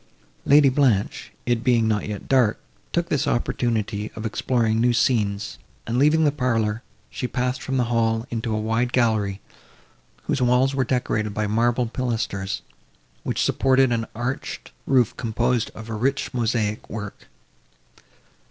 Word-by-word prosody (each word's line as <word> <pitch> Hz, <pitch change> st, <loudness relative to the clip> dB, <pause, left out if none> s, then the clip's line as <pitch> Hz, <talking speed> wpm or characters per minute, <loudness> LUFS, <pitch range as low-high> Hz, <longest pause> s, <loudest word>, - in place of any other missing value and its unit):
Lady 145 Hz, 0 st, +7 dB
Blanche, 125 Hz, -7 st, +1 dB
it 120 Hz, -1 st, 0 dB
being 120 Hz, -3 st, +3 dB
not 105 Hz, -2 st, 0 dB
yet 105 Hz, -2 st, -6 dB
dark, 125 Hz, -5 st, +3 dB, 0.3 s
took 170 Hz, 0 st, -1 dB
this 145 Hz, -, 0 dB
opportunity 110 Hz, -3 st, -1 dB
of 110 Hz, -, -6 dB
exploring 115 Hz, 0 st, +1 dB
new 120 Hz, 0 st, +3 dB
scenes, 105 Hz, -4 st, 0 dB, 0.3 s
and, 120 Hz, +2 st, -1 dB
leaving 150 Hz, +3 st, +4 dB
the 145 Hz, -, +4 dB
parlour, 115 Hz, -5 st, 0 dB, 0.3 s
she 125 Hz, -, -3 dB
passed 125 Hz, 0 st, -2 dB
from 135 Hz, -1 st, -2 dB
the 125 Hz, -, +3 dB
hall 115 Hz, -1 st, +1 dB
into 115 Hz, -1 st, -2 dB
a 110 Hz, -, 0 dB
wide 115 Hz, +3 st, 0 dB
gallery, 110 Hz, -5 st, +1 dB, 0.8 s
whose 135 Hz, -, -1 dB
walls 125 Hz, +2 st, +3 dB
were 135 Hz, -1 st, +1 dB
decorated 110 Hz, -4 st, -1 dB
by 105 Hz, -, 0 dB
marble 120 Hz, +3 st, +1 dB
pilasters, 115 Hz, -5 st, -3 dB, 0.6 s
which -, -, -1 dB
supported 135 Hz, -1 st, +3 dB
an 115 Hz, -1 st, -1 dB
arched 120 Hz, +4 st, -4 dB, 0.2 s
roof, 125 Hz, -5 st, +3 dB
composed 120 Hz, +1 st, 0 dB
of 110 Hz, 0 st, -9 dB
a 115 Hz, -, -5 dB
rich 135 Hz, +6 st, -1 dB
mosaic 110 Hz, -3 st, -1 dB
work. 105 Hz, -2 st, -7 dB
120 Hz, 145 wpm, -23 LUFS, 110-125 Hz, 0.8 s, Lady